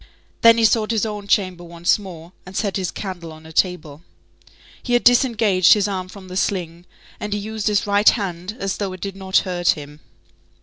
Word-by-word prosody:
Then 230 0 +7
he 230 - +4
sought 215 0 +2
his 225 -2 0
own 210 -2 -6
chamber 185 -4 0
once 170 +3 0
more, 175 -4 -10
and 185 +1 -9
set 200 -3 -1
his 185 -2 -1
candle 175 -5 -7
on 155 0 -14
a 160 - -12
table. 165 -5 -1 0.8
He 245 - -3
had 240 - +3
disengaged 225 -7 +4
his 210 -1 +1
arm 185 -2 -4
from 190 0 -12
the 185 - -8
sling, 175 -3 -2 0.3
and 210 0 -4
he - - -1
used 215 +1 -4
his 210 -1 +1
right 205 +1 +5
hand 190 -2 -3
as 195 -5 -3
though 195 -2 -3
it 185 - -10
did 195 -1 -5
not 190 -1 0
hurt 175 -1 +1
him. 150 0 -10
190 Hz, 205 wpm, -21 LUFS, 175-210 Hz, 0.8 s, Then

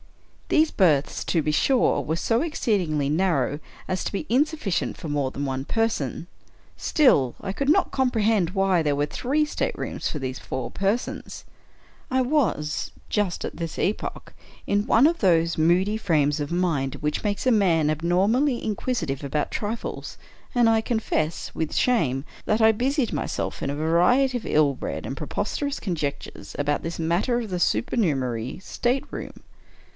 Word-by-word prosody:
These 315 0 +3
berths, 155 -8 +2
to 165 -3 +1
be 150 - +1
sure, 250 - +3
were 160 - -2
so 225 +6 +1
exceedingly 185 - 0
narrow 150 -3 +1 0.3
as 185 -1 -2
to - - -3
be 200 - -3
insufficient 280 - 0
for 165 - -7
more 145 -3 0
than 140 - -4
one 135 -1 -2
person; 195 - -1 0.5
still, 145 - +3
I 195 - -4
could 275 +6 -1
not 375 +4 +3
comprehend 225 -8 +2
why 195 -2 +2
there 145 -2 +1
were 145 +1 +1
three 280 - 0
staterooms 300 - -3
for - - -4
these 130 -1 -4
four 130 - -5
persons. 200 +5 -2 0.6
I 260 0 +2
was, 230 - 0 0.2
just 205 -4 -1
at - - -6
that 165 -2 -5
epoch, 205 - -2 0.3
in 205 +1 +1
one 240 - +5
of 335 +1 0
those 170 -4 +3
moody 180 +6 +3
frames 150 -8 +1
of 145 - -4
mind 165 -7 0
which 150 0 -2
make 205 +2 -1
a 255 - +4
man 170 -8 +3
abnormally 195 - +2
in 215 -2 -2
quisitive 165 - -2
about 145 +2 -2
trifles: 220 +2 -4 0.4
and 240 -1 +5
I 225 -1 +4
confess, 215 -9 -2
with 160 -1 -2
shame, 145 - +1 0.2
that 215 - +1
I 220 0 +6
busied 255 +3 0
myself - - -3
in - - -2
a 140 - -2
variety 180 - +3
of 240 - -3
ill 150 -2 +3
bred - - -5
and - - -4
preposterous 285 -1 -3
con 185 -4 -2
jectures 145 -3 -5
about 145 0 0
this 165 +1 -5
matter 175 +10 +1
of 225 -5 -5
the 180 - -1
supernumerary 135 - 0
stateroom. 245 +6 -3
185 Hz, 160 wpm, -25 LUFS, 150-235 Hz, 0.6 s, I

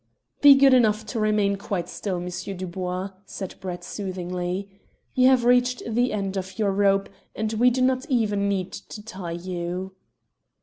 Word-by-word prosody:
"Be 285 -1 +10
good 270 -1 +6
enough 220 -3 +3
to 225 +2 -4
remain 210 -2 +2
quite 195 -3 -3
still, 195 -3 -4
M. 175 +1 -5 0.3
Dubois," 185 +1 -4 0.2
said 190 -2 -6
Brett 180 -2 -6
soothingly. 180 -1 -4 0.5
"You 255 0 +5
have 260 -2 +4
reached 250 0 +3
the 240 +2 +1
end 195 -2 -2
of 190 0 -5
your 205 -3 +1
rope, 195 0 +2 0.3
and 220 0 -2
we 240 +3 +4
do 255 +1 0
not 260 +2 +1
even 210 -5 +1
need 190 -2 -1
to 210 - -9
tie 190 -5 -7
you." 180 +2 -4
200 Hz, 165 wpm, -25 LUFS, 185-235 Hz, 0.5 s, Be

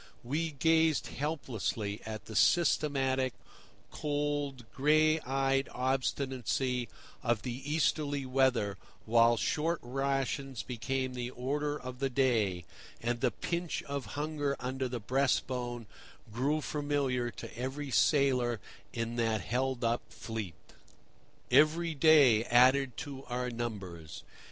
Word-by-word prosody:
We 155 +5 -2
gazed 160 +1 +3
helplessly 110 - -3
at 110 -1 -6
the 110 - -9
systematic, 135 - +2 0.6
cold, 145 -4 -2
gray 155 +3 +4
eyed 135 0 0
obstinacy 130 -1 -1 0.3
of 120 -3 0
the 125 +1 -4
Easterly 145 -3 +1
weather, 130 -6 +2 0.3
while 115 +1 +5
short 160 +9 0
rations 135 0 -2
became 130 +1 -2
the 125 -1 -4
order 145 +4 -2
of 125 0 -8
the 135 -1 0
day, 115 -9 +1 0.3
and 120 0 -2
the 125 - +3
pinch 170 - -3
of 140 -6 -5
hunger 145 -2 -1
under 130 +1 -2
the 120 -1 -3
breast 130 +4 +1
bone 120 -2 -4 0.5
grew 140 +6 +1
familiar 145 -5 -1
to - - -9
every 135 +3 -4
sailor 125 -5 +3 0.3
in 115 0 -3
that 115 -2 +1
held 125 +2 -1
up 115 +1 +1
fleet. 110 -7 -6 1.0
Every 165 +2 +4
day 140 -7 +6
added 125 +1 +4
to 135 -2 -6
our 125 0 -3
numbers. 100 -9 -6
130 Hz, 115 wpm, -31 LUFS, 120-145 Hz, 1.0 s, day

